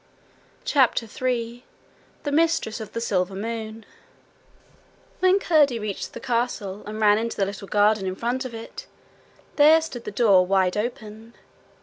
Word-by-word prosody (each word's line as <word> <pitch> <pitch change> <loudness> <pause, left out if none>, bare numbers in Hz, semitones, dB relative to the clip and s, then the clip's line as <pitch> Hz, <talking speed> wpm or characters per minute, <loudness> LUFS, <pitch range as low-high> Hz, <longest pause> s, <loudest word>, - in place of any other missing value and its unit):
CHAPTER 260 -4 +2
3 240 +1 -3 0.6
The 290 - -2
Mistress 325 -7 +1
of 215 -1 -9
the 230 - -2
Silver 190 -4 -1
Moon 220 +1 -5 1.3
When 370 +1 +4
Curdie 300 -10 +3
reached 210 -3 -5
the - - -7
castle, 230 -5 -2
and 215 +1 -6
ran 210 -1 +4
into 230 +1 -4
the 195 - +2
little 200 0 -7
garden 205 -1 +2
in 185 - -3
front 245 +5 -2
of 250 -3 -7
it, 225 0 -9 0.7
there 310 +2 +7
stood 315 -7 -7
the - - -3
door 200 -4 +4
wide 185 -1 +1
open. 220 0 -5
225 Hz, 145 wpm, -24 LUFS, 205-250 Hz, 1.3 s, there